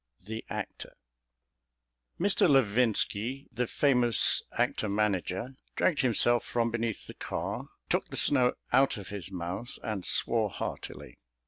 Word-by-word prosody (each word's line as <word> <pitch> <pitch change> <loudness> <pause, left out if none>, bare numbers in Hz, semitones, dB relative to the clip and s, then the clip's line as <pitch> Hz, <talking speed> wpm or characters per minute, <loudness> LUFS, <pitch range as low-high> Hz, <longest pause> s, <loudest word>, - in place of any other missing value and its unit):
L. - - -30
THE 110 0 -5
ACTOR - - -7 1.3
Mr. 195 -2 +2
Levinski, 125 0 +1
the 120 0 -2
famous 125 -4 +4
actor 110 - -1
manager, 100 +4 -2 0.2
dragged 170 - +1
himself 120 -1 +3
from 115 -1 -1
beneath 115 -2 -3
the - - -10
car, - - -5 0.2
took - - -1
the - - -5
snow 130 -4 +4 0.2
out 135 -1 +3
of 95 -2 -9
his 100 -3 -7
mouth, 90 +5 -5
and 105 -4 -4
swore 110 +2 +3
heartily. 70 -7 -7
115 Hz, 130 wpm, -29 LUFS, 100-125 Hz, 1.3 s, famous